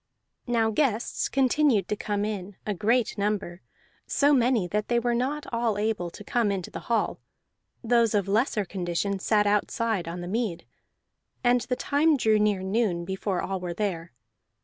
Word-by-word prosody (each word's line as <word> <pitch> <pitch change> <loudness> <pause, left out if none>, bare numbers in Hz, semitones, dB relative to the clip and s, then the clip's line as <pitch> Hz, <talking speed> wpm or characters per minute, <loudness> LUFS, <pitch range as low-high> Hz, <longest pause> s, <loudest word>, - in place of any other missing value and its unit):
Now 230 -2 +2
guests 235 -2 0
continued 265 -6 +2
to 210 - 0
come 205 0 -2
in, 205 -2 -5
a 210 - -1
great 220 +3 +1
number, 200 -3 -2 0.5
so 285 +1 +3
many 240 -7 +3
that 210 +2 -1
they 240 - +1
were 240 0 0
not 270 +5 -1
all 230 -3 0
able 210 -4 -1
to 190 - -11
come 225 -1 +1
into 190 -3 -4
the - - -6
hall; 230 - 0 0.6
those 230 -2 +3
of 200 -2 +1
lesser 215 0 +1
condition 185 +2 -2
sat 210 +1 +2
outside 210 -1 0
on 175 +1 -5
the 175 - -6
mead. 195 -4 -2 0.8
And 245 0 +4
the 250 +1 -2
time 295 +3 +2
drew 220 -4 +3
near 210 -3 +1
noon 190 -4 0
before 190 0 -2
all 190 -1 -2
were 175 -1 -5
there. 175 -4 -3
210 Hz, 170 wpm, -26 LUFS, 195-235 Hz, 0.8 s, And